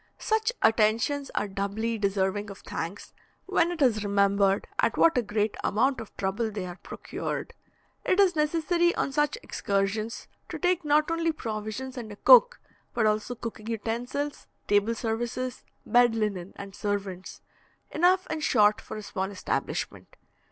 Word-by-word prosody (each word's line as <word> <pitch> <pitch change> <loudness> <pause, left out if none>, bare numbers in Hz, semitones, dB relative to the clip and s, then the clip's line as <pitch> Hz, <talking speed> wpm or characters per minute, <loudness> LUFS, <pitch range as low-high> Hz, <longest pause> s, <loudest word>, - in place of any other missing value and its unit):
Such 440 +1 +1
attentions 230 +6 +2
are 205 - 0
doubly 205 +4 -2
deserving 200 +1 0
of 195 - -8
thanks, 170 +5 -6 0.3
when 345 -3 +2
it 340 -4 0
is 220 -5 +2
remembered 200 -1 +2
at - - +2
what 330 - +5
a 250 - +3
great 210 -1 -1
amount 255 +4 +1
of 225 - -12
trouble 200 +4 -1
they 205 -3 -5
are 180 0 -8
procured. - - -5 0.5
It 370 - +1
is 375 -3 +5
necessary 335 +3 +2
on - - -1
such 295 - +1
excursions 200 +3 -2 0.2
to - - -4
take 360 -1 +1
not 300 +1 +2
only 330 0 +1
provisions 230 0 -5
and 225 -3 -6
a - - -8
cook, - - +6 0.4
but 235 -2 +2
also 215 +3 0
cooking 225 -2 -7
utensils, 235 +6 -3 0.2
table 205 +3 +2
services, 240 +3 -3 0.2
bed 240 -1 +4
linen, 200 -4 -2
and 195 -1 -9
servants, 200 -3 -4 0.5
enough 365 +3 +3
in 320 - -2
short 215 -8 +3
for - - -8
a 215 - -7
small 190 -1 -3
establishment. 200 -2 -4
225 Hz, 150 wpm, -27 LUFS, 205-295 Hz, 0.5 s, cook